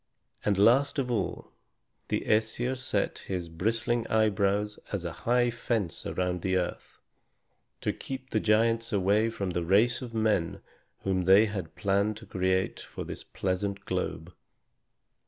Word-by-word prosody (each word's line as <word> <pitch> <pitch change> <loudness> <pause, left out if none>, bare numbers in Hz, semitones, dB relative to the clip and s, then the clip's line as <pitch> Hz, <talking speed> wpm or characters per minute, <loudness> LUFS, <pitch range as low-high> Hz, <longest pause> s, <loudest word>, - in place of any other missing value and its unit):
And 100 -2 +2
last 125 +9 +4
of 130 -3 0
all, 105 -5 -2 0.6
the - - 0
Æsir 110 +4 +1
set 130 0 -1
his 90 -3 -4
bristling 115 +7 0
eyebrows 105 -1 +1
as 95 -4 -3
a 85 - -2
high 120 +6 +1
fence 115 -6 -2
around 90 -1 -1
the 95 0 +1
earth, 90 -1 -4 0.8
to - - 0
keep 130 -1 -7
the 110 - +2
giants 115 +2 +2
away 105 +2 +3
from 100 -4 -3
the 85 0 -1
race 105 +9 +3
of 120 -3 -7
men 110 -6 +1 0.4
whom 95 -2 0
they 95 +4 +7
had 95 -6 -5
planned 100 +2 +1
to 115 - -11
create 95 -1 0
for - - -7
this - - -7
pleasant 100 +1 -2
globe. 85 +3 -3
105 Hz, 145 wpm, -29 LUFS, 95-115 Hz, 0.8 s, they